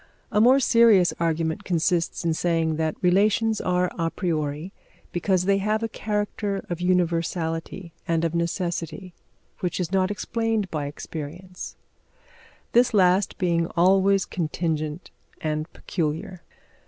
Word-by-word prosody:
A 210 Hz, -1 st, +3 dB
more 255 Hz, +4 st, +6 dB
serious 230 Hz, -8 st, +5 dB
argument 165 Hz, +2 st, 0 dB
consists 170 Hz, -1 st, 0 dB
in 165 Hz, -, +2 dB
saying 165 Hz, -1 st, 0 dB
that 160 Hz, -1 st, 0 dB
relations 210 Hz, +4 st, +3 dB
are 180 Hz, 0 st, +1 dB
a 165 Hz, 0 st, +1 dB
priori 160 Hz, 0 st, -2 dB, 0.4 s
because 180 Hz, +1 st, +1 dB
they 195 Hz, 0 st, +3 dB
have 215 Hz, +3 st, 0 dB
a -, -, +1 dB
character 210 Hz, -2 st, -3 dB
of 175 Hz, 0 st, -3 dB
universality 170 Hz, -1 st, -1 dB
and 165 Hz, 0 st, +1 dB
of 165 Hz, -, -1 dB
necessity 170 Hz, +1 st, -3 dB, 0.5 s
which 180 Hz, -3 st, -2 dB
is 180 Hz, -1 st, -2 dB
not 190 Hz, -1 st, +2 dB
explained 225 Hz, -1 st, -1 dB
by 150 Hz, -3 st, -2 dB
experience, 165 Hz, +5 st, -7 dB, 1.0 s
this 240 Hz, -1 st, +4 dB
last 185 Hz, 0 st, +3 dB
being 170 Hz, -2 st, +1 dB
always 195 Hz, +2 st, +4 dB
contingent 160 Hz, -1 st, -3 dB, 0.3 s
and 155 Hz, -1 st, -3 dB
peculiar. 170 Hz, +2 st, -3 dB
180 Hz, 125 wpm, -25 LUFS, 165-195 Hz, 1.0 s, more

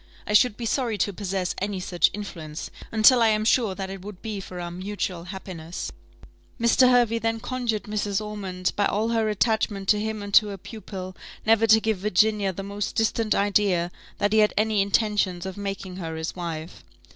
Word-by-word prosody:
I 210 Hz, -, -2 dB
should 210 Hz, 0 st, +4 dB
be 235 Hz, -, -4 dB
sorry 230 Hz, -2 st, 0 dB
to 205 Hz, -, 0 dB
possess 190 Hz, -2 st, -2 dB
any 200 Hz, -1 st, -2 dB
such 180 Hz, -1 st, +2 dB
influence, 165 Hz, -7 st, -7 dB, 0.2 s
until 230 Hz, +3 st, +6 dB
I 230 Hz, -, +6 dB
am 215 Hz, 0 st, +2 dB
sure 225 Hz, -4 st, +2 dB
that 190 Hz, -1 st, -5 dB
it 195 Hz, -1 st, -7 dB
would 200 Hz, -1 st, -10 dB
be 215 Hz, -3 st, -4 dB
for 180 Hz, -1 st, -8 dB
our 175 Hz, 0 st, -5 dB
mutual 185 Hz, -1 st, -4 dB
happiness." 180 Hz, -3 st, -6 dB, 0.7 s
Mr. 235 Hz, +2 st, +5 dB
Hervey 240 Hz, -2 st, +3 dB
then 225 Hz, 0 st, -1 dB
conjured 240 Hz, -3 st, -2 dB
Mrs. 205 Hz, -1 st, -1 dB
Ormond, 195 Hz, -4 st, -3 dB
by 205 Hz, -, +2 dB
all 215 Hz, +3 st, 0 dB
her 225 Hz, -2 st, +1 dB
attachment 210 Hz, -2 st, 0 dB
to 210 Hz, -, +5 dB
him 215 Hz, -1 st, -3 dB
and 200 Hz, 0 st, -7 dB
to 210 Hz, -, +7 dB
her 200 Hz, -1 st, -5 dB
pupil, 190 Hz, -2 st, -8 dB, 0.3 s
never 225 Hz, 0 st, +4 dB
to 220 Hz, 0 st, +7 dB
give 220 Hz, -3 st, -1 dB
Virginia 210 Hz, 0 st, +2 dB
the 195 Hz, +2 st, -6 dB
most 200 Hz, +1 st, -4 dB
distant 225 Hz, 0 st, +1 dB
idea 200 Hz, -4 st, +2 dB, 0.3 s
that 205 Hz, +1 st, +1 dB
he 220 Hz, -, +5 dB
had 210 Hz, 0 st, +3 dB
any 215 Hz, -1 st, +2 dB
intentions 200 Hz, -3 st, +1 dB
of 190 Hz, -1 st, -5 dB
making 195 Hz, -2 st, -5 dB
her 165 Hz, -3 st, -5 dB
his 160 Hz, 0 st, -4 dB
wife. 165 Hz, -2 st, -6 dB
205 Hz, 190 wpm, -25 LUFS, 185-220 Hz, 0.7 s, to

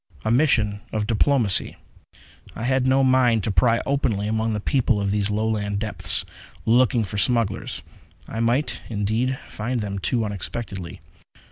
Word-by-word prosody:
A 110 Hz, -, +1 dB
mission 115 Hz, -6 st, +2 dB
of 105 Hz, -1 st, -1 dB
diplomacy. 115 Hz, -2 st, +2 dB, 0.8 s
I -, -, -6 dB
had 130 Hz, +1 st, +1 dB
no 135 Hz, +1 st, +4 dB
mind 125 Hz, -4 st, +3 dB
to 110 Hz, -, -1 dB
pry 115 Hz, +6 st, +3 dB
openly 115 Hz, -7 st, 0 dB
among 110 Hz, +1 st, 0 dB
the 105 Hz, -, -1 dB
people 120 Hz, 0 st, +1 dB
of 100 Hz, -1 st, -1 dB
these 105 Hz, 0 st, 0 dB
Lowland 105 Hz, -1 st, -1 dB
depths, 105 Hz, 0 st, 0 dB, 0.4 s
looking 120 Hz, 0 st, +3 dB
for 105 Hz, 0 st, -4 dB
smugglers. 115 Hz, -3 st, 0 dB, 0.4 s
I 115 Hz, -, -5 dB
might, 120 Hz, +6 st, 0 dB
indeed, 115 Hz, +5 st, -1 dB
find 120 Hz, +3 st, -3 dB
them 100 Hz, -2 st, -4 dB
too 115 Hz, +4 st, 0 dB
unexpectedly! 100 Hz, -4 st, -6 dB
110 Hz, 145 wpm, -23 LUFS, 105-125 Hz, 0.8 s, no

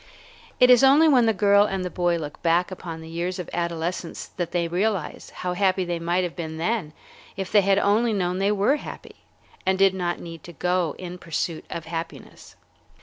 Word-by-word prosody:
It 250 Hz, 0 st, +7 dB
is 250 Hz, +1 st, +6 dB
only 285 Hz, +4 st, +6 dB
when 250 Hz, -6 st, +5 dB
the -, -, +5 dB
girl 200 Hz, 0 st, +4 dB
and 190 Hz, -2 st, -2 dB
the 180 Hz, -, -4 dB
boy 175 Hz, -1 st, +1 dB
look 150 Hz, -3 st, -7 dB
back 170 Hz, +2 st, +2 dB
upon 170 Hz, -3 st, -7 dB
the 160 Hz, -, -10 dB
years 170 Hz, +3 st, -3 dB
of 180 Hz, -, -6 dB
adolescence 170 Hz, 0 st, -3 dB
that 175 Hz, -2 st, -2 dB
they 170 Hz, -1 st, 0 dB
realize 185 Hz, -1 st, -2 dB
how 180 Hz, -1 st, -4 dB
happy 185 Hz, 0 st, +1 dB
they 175 Hz, -1 st, -2 dB
might 175 Hz, +2 st, 0 dB
have 175 Hz, -2 st, -4 dB
been 160 Hz, -2 st, -5 dB
then 175 Hz, -2 st, -2 dB, 0.4 s
if 195 Hz, -1 st, -4 dB
they 205 Hz, -, +6 dB
had 195 Hz, 0 st, +3 dB
only 215 Hz, +4 st, +2 dB
known 180 Hz, -3 st, -1 dB
they 200 Hz, +1 st, +2 dB
were 210 Hz, +8 st, +2 dB
happy, -, -, -10 dB, 0.5 s
and 190 Hz, 0 st, +1 dB
did 195 Hz, 0 st, +4 dB
not 175 Hz, -2 st, -2 dB
need 165 Hz, -3 st, -9 dB
to 175 Hz, -, -10 dB
go 180 Hz, 0 st, 0 dB
in 180 Hz, 0 st, -8 dB
pursuit 165 Hz, -1 st, -3 dB
of 165 Hz, -, -6 dB
happiness. 165 Hz, +1 st, -8 dB
180 Hz, 205 wpm, -24 LUFS, 170-200 Hz, 0.5 s, It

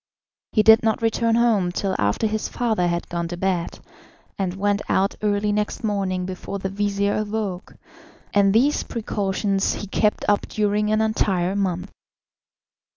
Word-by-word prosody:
He 215 Hz, -, +4 dB
did 220 Hz, +1 st, +7 dB
not 225 Hz, 0 st, 0 dB
return 230 Hz, 0 st, +2 dB
home 220 Hz, -7 st, +2 dB
till 190 Hz, +1 st, -2 dB
after 100 Hz, -, +1 dB
his 215 Hz, 0 st, -1 dB
father 220 Hz, -7 st, 0 dB
had 170 Hz, 0 st, -2 dB
gone 170 Hz, -1 st, -3 dB
to 175 Hz, +1 st, -6 dB
bed, 180 Hz, -2 st, -1 dB, 0.6 s
and 190 Hz, -2 st, -2 dB
went 205 Hz, +1 st, 0 dB
out 195 Hz, +1 st, +2 dB
early 210 Hz, 0 st, +1 dB
next 210 Hz, +2 st, -2 dB
morning 195 Hz, -4 st, -1 dB
before 185 Hz, +2 st, -5 dB
the 190 Hz, 0 st, -3 dB
vizir 200 Hz, 0 st, 0 dB
awoke, 210 Hz, -3 st, -3 dB, 0.6 s
and 200 Hz, -1 st, +4 dB
these 260 Hz, +8 st, +3 dB
precautions 200 Hz, -3 st, -1 dB
he -, -, -5 dB
kept 210 Hz, +2 st, 0 dB
up 205 Hz, 0 st, +2 dB
during 210 Hz, 0 st, 0 dB
an 215 Hz, 0 st, +2 dB
entire 195 Hz, -4 st, 0 dB
month. 190 Hz, -1 st, -2 dB
205 Hz, 155 wpm, -23 LUFS, 190-215 Hz, 0.6 s, did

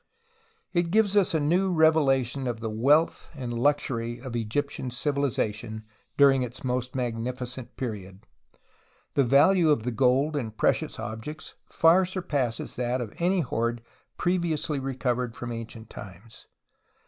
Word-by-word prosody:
It 175 Hz, -1 st, +1 dB
gives 210 Hz, +1 st, +3 dB
us 195 Hz, -5 st, +3 dB
a -, -, +3 dB
new 180 Hz, +6 st, +2 dB
revelation 140 Hz, -6 st, +3 dB
of 120 Hz, -2 st, -3 dB
the 110 Hz, -1 st, -4 dB
wealth 145 Hz, +9 st, +2 dB
and 125 Hz, -4 st, -5 dB
luxury 120 Hz, -2 st, 0 dB
of 125 Hz, -1 st, -7 dB
Egyptian 130 Hz, +4 st, -2 dB
civilization 120 Hz, -5 st, -2 dB, 0.3 s
during 135 Hz, -2 st, +6 dB
its 125 Hz, 0 st, -5 dB
most 125 Hz, 0 st, -2 dB
magnificent 125 Hz, +1 st, -4 dB
period. 100 Hz, -5 st, -6 dB, 0.9 s
The 140 Hz, -, +3 dB
value 155 Hz, +7 st, +5 dB
of 145 Hz, -7 st, +3 dB
the 125 Hz, -, -1 dB
gold 135 Hz, +5 st, +2 dB
and 110 Hz, -6 st, -4 dB
precious -, -, +1 dB
objects 130 Hz, +9 st, -6 dB, 0.2 s
ftu* 175 Hz, +3 st, +4 dB
surpasses 145 Hz, -10 st, -2 dB
that 125 Hz, +1 st, 0 dB
of 115 Hz, -4 st, -5 dB
any 180 Hz, +2 st, +2 dB
hoard 115 Hz, -3 st, -2 dB, 0.3 s
previously 170 Hz, -5 st, 0 dB
recovered 125 Hz, -2 st, -2 dB
from 120 Hz, -1 st, -5 dB
ancient 115 Hz, -1 st, -8 dB
times. 100 Hz, +4 st, -12 dB
130 Hz, 135 wpm, -27 LUFS, 115-150 Hz, 0.9 s, during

